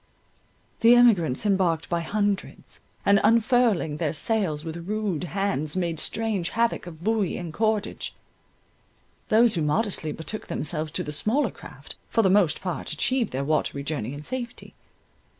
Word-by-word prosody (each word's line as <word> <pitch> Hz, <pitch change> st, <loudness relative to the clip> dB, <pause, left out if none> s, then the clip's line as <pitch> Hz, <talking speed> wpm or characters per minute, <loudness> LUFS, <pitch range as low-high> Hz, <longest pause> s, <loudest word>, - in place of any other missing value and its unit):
The 230 Hz, +1 st, +7 dB
emigrants 205 Hz, -, +4 dB
embarked 185 Hz, -5 st, +1 dB
by 170 Hz, -1 st, -1 dB
hundreds, 205 Hz, +3 st, -2 dB, 0.2 s
and 200 Hz, 0 st, +5 dB
unfurling 225 Hz, -, +3 dB
their 155 Hz, -2 st, -1 dB
sails 170 Hz, -3 st, -1 dB
with 165 Hz, +1 st, -6 dB
rude 205 Hz, -6 st, -2 dB
hands, 185 Hz, -4 st, -1 dB
made 170 Hz, -3 st, -1 dB
strange 215 Hz, -6 st, 0 dB
havoc 230 Hz, -5 st, 0 dB
of 165 Hz, -1 st, -10 dB
buoy 215 Hz, -3 st, 0 dB
and 170 Hz, -3 st, -6 dB
cordage. 215 Hz, 0 st, -1 dB, 1.1 s
Those 225 Hz, +1 st, +5 dB
who 170 Hz, -, 0 dB
modestly 155 Hz, +1 st, 0 dB
betook 160 Hz, +8 st, -6 dB
themselves 155 Hz, 0 st, -3 dB
to -, -, -1 dB
the 150 Hz, -, -5 dB
smaller 215 Hz, -, +1 dB
craft, -, -, -12 dB
for 225 Hz, -, +2 dB
the 190 Hz, -, +4 dB
most 190 Hz, -5 st, +3 dB
part 180 Hz, -4 st, -3 dB
achieved 235 Hz, -, 0 dB
their 135 Hz, +1 st, -2 dB
watery 140 Hz, -2 st, 0 dB
journey 140 Hz, -4 st, -3 dB
in 145 Hz, -, -8 dB
safety. 245 Hz, +3 st, -5 dB
190 Hz, 150 wpm, -25 LUFS, 155-220 Hz, 1.1 s, The